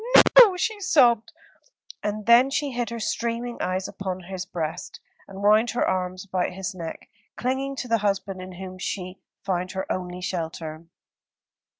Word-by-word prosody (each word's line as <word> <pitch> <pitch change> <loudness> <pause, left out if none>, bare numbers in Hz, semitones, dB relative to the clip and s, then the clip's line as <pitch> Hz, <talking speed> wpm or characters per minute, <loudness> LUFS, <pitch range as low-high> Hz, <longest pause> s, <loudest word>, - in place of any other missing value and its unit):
"No, - - +12 0.2
no," 380 -4 -2
she 430 +3 -1
sobbed; 250 - +4 0.7
and 210 0 -3
then 235 +4 +6
she 285 0 -1
hid 240 -1 -2
her 235 0 -5
streaming 235 +2 -2
eyes 185 +1 -1
upon 185 -1 -5
his 185 0 -6
breast, 165 -2 -5 0.3
and 195 0 -9
wound 215 +3 +5
her 240 - 0
arms 185 0 -2
about 185 -2 -1
his 190 +1 -4
neck, 165 -3 -7 0.3
clinging 265 +2 -2
to 255 - -5
the 230 -1 +2
husband 195 -2 -1
in 185 0 -8
whom 185 0 -8
she 185 0 -4 0.2
found 185 -2 -2
her 190 0 -3
only 180 -1 -3
shelter. 165 -3 -4
195 Hz, 165 wpm, -25 LUFS, 185-235 Hz, 0.7 s, No